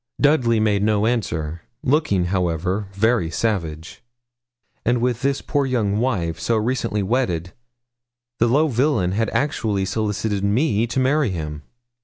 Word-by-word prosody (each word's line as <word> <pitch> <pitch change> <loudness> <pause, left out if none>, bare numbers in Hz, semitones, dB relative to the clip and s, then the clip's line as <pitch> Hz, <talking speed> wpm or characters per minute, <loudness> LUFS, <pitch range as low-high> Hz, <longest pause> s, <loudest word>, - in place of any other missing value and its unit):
Dudley 130 -6 +3
made 105 -2 +2
no 105 0 +2
answer, 85 -9 -2 0.2
looking, 130 - +2
however, 90 +2 -1
very 110 -3 +2
savage. 80 -5 -3 0.8
And 120 +1 +2
with 125 0 0
this 140 0 0
poor 145 -3 0
young 110 -5 0
wife, 90 -10 -1
so 115 +6 +1
recently 115 -2 -1
wedded, 95 -6 -1 0.9
the 120 - +4
low 145 +7 +3
villain 125 -8 +1
had 110 +2 0
actually 110 -9 0
solicited 105 0 -1
me 110 +1 +2
to 125 - -1
marry 135 0 +2
him! 75 -4 -5
110 Hz, 135 wpm, -22 LUFS, 95-125 Hz, 0.9 s, the